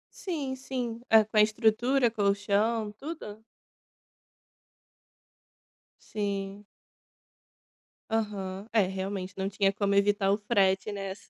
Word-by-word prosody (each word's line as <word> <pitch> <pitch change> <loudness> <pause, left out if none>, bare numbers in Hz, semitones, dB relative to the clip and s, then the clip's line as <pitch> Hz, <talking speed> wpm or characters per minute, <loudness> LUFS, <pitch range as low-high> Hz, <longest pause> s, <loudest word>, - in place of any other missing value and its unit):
Sim, 295 -8 -4
sim. 250 -3 -4
Hã, 220 -1 +8
com 215 +1 -4
a - - +8
estrutura, 230 +4 +3
colchão, 205 +1 +1
tudo? 220 -4 -8 2.6
Sim. 200 -1 -4 1.5
Aham. 205 -3 -3
É, 220 - +5
realmente 190 0 -4
não 190 0 -1
tinha 195 0 +1
como 200 0 0
evitar 200 0 +3
o 200 - +2
frete 200 -2 +1
nessa. 195 -1 -7
205 Hz, 100 wpm, -28 LUFS, 195-225 Hz, 2.6 s, Hã